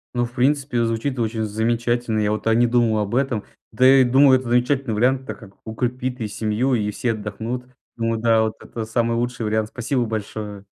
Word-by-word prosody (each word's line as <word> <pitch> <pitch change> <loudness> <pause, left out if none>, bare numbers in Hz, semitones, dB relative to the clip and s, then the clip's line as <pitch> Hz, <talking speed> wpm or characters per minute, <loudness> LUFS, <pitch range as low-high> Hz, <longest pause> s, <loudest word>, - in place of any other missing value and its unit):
Ну, 120 0 +1
в 120 - -10
принципе, 135 -1 +1
звучит 115 +4 -2
очень 110 -1 -1
замечательно. 115 +1 0
Я 105 -1 +1
вот, 110 - -3
а, 115 - +3
не 120 +2 +4
думал 115 -2 +2
об 105 +2 -2
этом. 130 -5 0 0.3
Да, 120 +4 -1
и 135 0 +7
думаю, 130 +1 +5
это 130 - -8
замечательный 125 0 +1
вариант, 130 +4 +1
так - - -7
как 100 -5 -14
укрепит 125 +2 -3
и 110 - -1
семью, 110 +5 0
и 105 -2 -1
все 120 +3 -1
отдохнут. 110 +4 -5 0.3
Думаю, 115 -1 -1
да, 115 -1 +4
вот 110 0 -1
это 115 -2 -6
самый 115 +1 0
лучший 120 0 -2
вариант. 110 0 0
Спасибо 120 +2 -1
большое! 105 -2 -5
115 Hz, 200 wpm, -22 LUFS, 110-125 Hz, 0.3 s, и